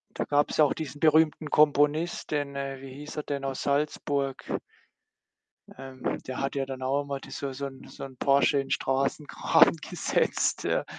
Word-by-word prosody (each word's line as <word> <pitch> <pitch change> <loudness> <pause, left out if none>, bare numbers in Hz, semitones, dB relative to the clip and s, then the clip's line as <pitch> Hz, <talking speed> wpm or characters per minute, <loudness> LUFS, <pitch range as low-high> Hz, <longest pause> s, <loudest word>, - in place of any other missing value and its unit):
Da - - -1
gab's 145 0 +1
ja 155 - +7
auch 145 - +1
diesen 150 -2 -6
berühmten 155 0 +3
Komponist 150 +3 +2
den, 145 -2 -1
äh 135 -1 -4
wie 135 -1 -9
hieß 150 +3 -9
er 150 - -2
denn, 140 -1 -4
aus 135 -1 -3
Salzburg? 140 -1 -1 1.3
Ähm, 130 -1 -4
der 130 - -5
hat 135 +1 -2
ja 135 -1 0
dann 130 -1 -7
auch 135 +2 +1
einmal 140 -1 -4
da 135 - -12
so 135 0 -4
so 140 +2 -5
'n 135 -1 -9
so - - -8
'n 130 -1 -11
Porsche 140 +2 +3
in 135 0 -4
Straßengraben 135 +2 +2
gesetzt, - - 0
ja. - - 0
140 Hz, 180 wpm, -28 LUFS, 135-150 Hz, 1.3 s, ja